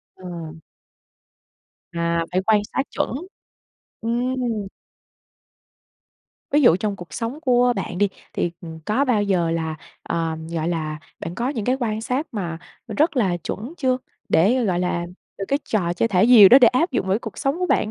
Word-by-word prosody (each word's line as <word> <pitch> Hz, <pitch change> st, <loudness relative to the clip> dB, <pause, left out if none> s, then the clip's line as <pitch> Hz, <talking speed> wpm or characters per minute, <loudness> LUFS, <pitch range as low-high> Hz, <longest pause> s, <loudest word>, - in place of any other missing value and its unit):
Ờ. 185 Hz, -1 st, -10 dB, 1.6 s
À, 170 Hz, 0 st, 0 dB
phải 185 Hz, -, +2 dB
quan 215 Hz, -1 st, +4 dB
sát 270 Hz, -, +1 dB
chuẩn. -, -, -1 dB, 0.9 s
Ừm. 235 Hz, -2 st, -1 dB, 1.8 s
Ví 295 Hz, -, +4 dB
dụ 175 Hz, -8 st, +6 dB
trong 210 Hz, -1 st, -2 dB
cuộc 175 Hz, -4 st, -11 dB
sống 240 Hz, +6 st, -4 dB
của 245 Hz, -4 st, +3 dB
bạn 185 Hz, -1 st, -4 dB
đi, 205 Hz, -, +3 dB, 0.2 s
thì, 175 Hz, -, -1 dB
ừm, 160 Hz, -1 st, -9 dB
có 255 Hz, +7 st, +2 dB
bao 235 Hz, -6 st, +2 dB
giờ 180 Hz, -5 st, +1 dB
là, 160 Hz, -1 st, -2 dB, 0.3 s
ờm, 160 Hz, -1 st, -3 dB
gọi 165 Hz, 0 st, -2 dB
là, 155 Hz, -3 st, -2 dB, 0.2 s
bạn 170 Hz, -, -5 dB
có 240 Hz, +4 st, -1 dB
những 235 Hz, -7 st, -3 dB
cái 255 Hz, +3 st, +2 dB
quan 220 Hz, -3 st, -1 dB
sát 255 Hz, +7 st, -2 dB
mà 175 Hz, -6 st, -4 dB, 0.4 s
rất 315 Hz, 0 st, +2 dB
là 190 Hz, -8 st, +2 dB
chuẩn 215 Hz, -, -6 dB
chưa? 260 Hz, -2 st, +1 dB, 0.3 s
Để, 230 Hz, +10 st, +3 dB
gọi 180 Hz, -4 st, +1 dB
là, 175 Hz, -1 st, -1 dB, 0.3 s
từ 195 Hz, -, -2 dB
cái 280 Hz, -, +2 dB
trò 175 Hz, -6 st, 0 dB
chơi 205 Hz, +6 st, 0 dB
thả 185 Hz, -3 st, +3 dB
diều 220 Hz, -6 st, +9 dB
đó 255 Hz, -, +9 dB
để 245 Hz, -4 st, +7 dB
áp 315 Hz, +8 st, +1 dB
dụng 235 Hz, -7 st, -1 dB
với 190 Hz, -, +2 dB
cái 210 Hz, -, +1 dB
cuộc 220 Hz, -, -8 dB
sống 275 Hz, +3 st, 0 dB
của 365 Hz, -, 0 dB
bạn 215 Hz, -, +1 dB
210 Hz, 180 wpm, -22 LUFS, 175-250 Hz, 1.8 s, diều